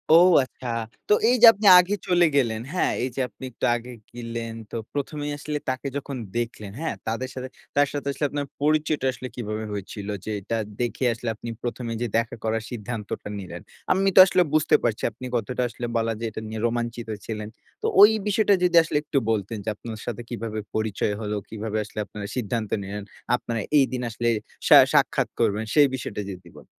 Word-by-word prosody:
ও - - +10 0.2
আচ্ছা। 130 -1 -9 0.4
তো - - +7 0.2
এই 250 - +5
যে - - +11
আপনি 205 +1 0
আগে 190 +3 +2
চলে 175 -1 +5
গেলেন, 115 -5 +2
হ্যাঁ? 180 - +1
এই 130 - 0
যে 135 - -1
আপনি - - -16
একটু - - -3
আগে 120 +1 -6 0.2
গেলেন 115 -1 -5 0.2
তো - - -6 0.2
১ম 145 +1 -3
এই - - -2
আসলে 150 +1 -3
তাকে 130 +2 -2
যখন 140 -1 -5 0.2
দেখলেন, 110 -4 -4
হ্যাঁ? 165 - -2
তাদের 125 +4 -2
সাথে, 130 0 -5 0.3
তার 145 0 +4
সাথে 140 -1 -4
আসলে 145 - -2
আপনার 145 -1 -3 0.2
পরিচয়টা 155 -2 +1
আসলে 130 +1 -7
কিভাবে 110 -2 -4
হয়েছিল? 100 0 -6 0.2
যে 110 - -3
এটা 115 +4 -2 0.2
দেখে 120 +2 -1
আসলে 115 0 -4
আপনি 115 +2 -7
১ম 120 0 -4
এ - - -1
যে 120 - 0
দেখা 115 0 -1
করার 110 0 -1
সিদ্ধান্তটা 110 -2 -5
নিলেন। 95 - -8 0.3
আমি 195 +1 +3
তো - - +9
আসলে 185 - +3
বুঝতে 155 -1 +4
পারছি 115 -3 0
আপনি 125 +4 -10
কতটা 120 +2 -1
আসলে 120 - -6
বলা 115 0 0
যায় 115 - -2
এটা 110 - -6
নিয়ে 110 0 -5
রোমাঞ্চিত 120 0 -3 0.2
ছিলেন। 105 -1 -5 0.3
তো - - -4
ঐ - - +11 0.3
বিষয়টা 205 0 +3
যদি 175 -1 +3
আসলে 150 - -1
একটু 145 -1 -2
বলতেন 105 +1 -2
যে - - 0
আপনার 110 0 -8
সাথে 120 -1 -4
কিভাবে 115 -2 -4 0.2
পরিচয় 110 -1 0
হলো? 105 0 -2
কিভাবে 110 0 -4
আসলে 105 - -8
আপনারা 100 +1 -7
সিদ্ধান্ত 115 -2 -2
নিলেন, 100 +1 -5 0.3
আপনারা 115 -2 -3 0.2
এইদিন 130 -2 +2
আসলে 120 +2 -2 0.4
সা - - +9 0.2
সাক্ষাৎ - - +3
করবেন 105 +2 +1
সেই 145 -2 +6
বিষয়টা 105 -5 -5
যদি 90 -2 -11
বলতেন। - - -13
120 Hz, 195 wpm, -25 LUFS, 110-140 Hz, 0.4 s, যে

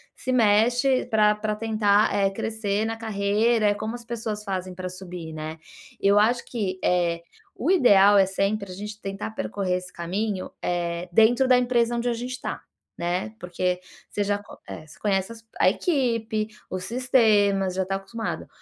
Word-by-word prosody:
se 255 - -4
mexe 245 +3 +3
pra 210 -1 +3
pra 210 0 -2
tentar, 215 -1 +2
eh, 200 -1 +2
crescer 215 0 -2
na 225 0 -2
carreira, 220 +1 +1
é 205 - +4
como 220 +3 -4
as 240 -1 -10
pessoas 225 -3 -4
fazem 185 -2 -4
para 185 0 -5
subir, 180 -3 -8
né. 155 +1 -6 0.4
Eu 200 +1 +4
acho 235 +3 +2
que, 195 -6 -3
eh, 170 -2 +1 0.4
o 290 - +1
ideal 205 - +6
é 195 - +6
sempre 195 +1 -1
a - - -6
gente 210 +2 -7
tentar 195 +2 -5
percorrer 195 -4 -2
esse 180 0 -8
caminho, 190 +3 -3
eh, 175 0 -2
dentro 230 +7 +5
da 255 -1 +5
empresa 240 -1 +2
onde 235 +1 -2
a 240 - +2
gente 245 +2 -5
está, 255 - -5 0.4
né, 180 +5 -2
porque 180 0 -2 0.3
você 205 - -1
já 205 0 0
co 205 - -13
eh, 155 - -8
você - - -15
conhece 195 +1 0
as 225 0 -14 0.2
a - - +6
equipe, 230 - 0 0.2
os 185 0 -4
sistemas, 210 -6 +2
já 190 - +1
está 195 +1 -2
acostumado. 195 +4 -5
205 Hz, 175 wpm, -25 LUFS, 190-225 Hz, 0.4 s, ideal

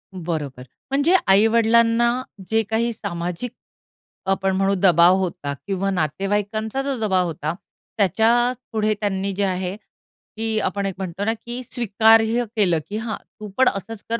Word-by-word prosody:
बरोबर 155 -7 -4 0.3
म्हणजे 285 +7 +3
आई-वडिलांना 230 +3 +4 0.4
जे 225 0 +3
काही 230 +1 +1
सामाजिक 180 +3 -4 0.8
आपण 190 0 0
म्हणू 195 +1 +2
दबाव 175 -1 +6
होता 165 -6 -3
किंवा 195 0 -1
नातेवाईकांचा 205 - -1
जो 275 0 -2
दबाव 190 -4 +2
होता, 155 -1 -3 0.4
त्याच्या 225 +5 +3 0.2
पुढे 215 -1 +1
त्यांनी 195 -1 -1
जे 200 - 0
आहे 185 0 -2
की 220 0 -6
आपण 200 0 -2
एक 195 - -2
म्हणतो 190 +1 -4
ना, 225 - +1
की 240 +2 -5
स्वीकार्य 225 0 +3
केलं 180 -6 +3
की 210 - -3
"हां, 225 0 -4
तू 215 -1 -11
पण 260 0 +5
असंच 205 +2 -7
कर." 230 0 0
205 Hz, 145 wpm, -22 LUFS, 185-225 Hz, 0.8 s, दबाव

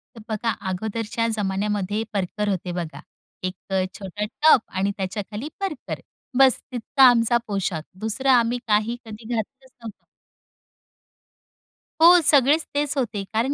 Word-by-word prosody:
तर 225 - -11
बघा 220 +1 -1 0.2
अगोदरच्या 220 +4 -2
जमान्यामध्ये 205 +1 -1
परकर 205 +2 -2
होते 180 -2 -2
बघा. 170 -2 -5 0.4
एक 185 0 -2
अ, 190 -1 +1 0.2
छोटा 200 +2 -4
टॉप 295 +2 +4
आणि 195 +2 +1
त्याच्या 195 +2 -3
खाली 235 +9 -5
परकर. 380 -9 -4 0.4
बस 265 -2 +5
तितका 250 +3 +1
आमचा 235 0 +3
पोशाख. 195 -5 -2 0.2
दुसरं 220 +5 -1
आम्ही 240 0 +3
काही 215 +3 +2
कधी 220 0 -10
घातलच 260 +4 -6
नव्हत. 220 -3 -10 2.0
हो, 350 +1 +9
सगळेच 290 +2 +4
तेच 290 0 0
होते 220 -6 -1
कारण 240 +6 +1
220 Hz, 135 wpm, -23 LUFS, 200-255 Hz, 2.0 s, हो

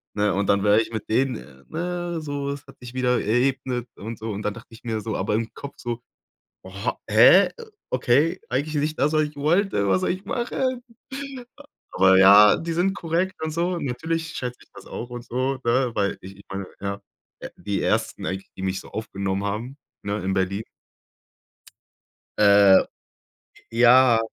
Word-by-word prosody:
Ne, 105 -1 +1
und 100 +1 0
dann 100 0 +2
wäre 105 +1 +5
ich 115 - -6
mit 110 - -5
denen 110 - -2
ne, 175 0 -3
so, 145 -2 -4
es 140 -1 -7
hat - - -15
sich 125 0 -10
wieder 125 -1 +1
geebnet 125 +1 0
und 110 +2 -7
so. 110 - -5
Und 105 +1 -5
dann 105 - -1
dachte 115 - -12
ich 115 0 -15
mir 110 -2 -3
so 110 0 -4
aber 100 +2 -1
im 115 +1 -1
Kopf 140 - -9
so: 120 0 -5 0.6
„Ho 95 0 -12 0.4
hä? 120 - +7 0.4
Okay, 145 +8 +2
eigentlich 150 +4 -2
nicht 150 +1 -1
das, 150 +2 +2
was 155 - +3
ich 150 0 -5
wollte. 155 - +1
Was 95 -1 +2
soll - - +1
ich 185 +2 -6
machen?“ 250 +1 -2 1.1
Aber 95 0 +5
ja, 100 +2 +8
die 165 0 -4
sind 190 +3 +1
korrekt 175 +3 -1
und 160 - -2
so. 175 +3 -1
Natürlich 160 +5 -3
schätze 125 -6 -5
ich - - -27
das - - -13
auch 120 - -6
und 120 0 -8
so, 130 +2 -2
ne, 125 +1 +2
weil 100 -1 0
ich 95 +1 -11
ich 100 - -15
meine, 95 0 -4
äh, - - -8
ja, 100 0 -3 0.6
die 100 -2 -3
1. - - -1
eigentlich, 95 0 -4
die - - -7
mich 95 0 -1
so - - -14
aufgenommen 100 -2 -3
haben, 115 +7 -4 0.3
ne, 100 +1 -2
in 95 - -1
Berlin. 95 +3 -1 1.7
Äh, 100 -2 +6 0.9
ja. 120 0 +6
120 Hz, 180 wpm, -24 LUFS, 100-150 Hz, 1.7 s, ja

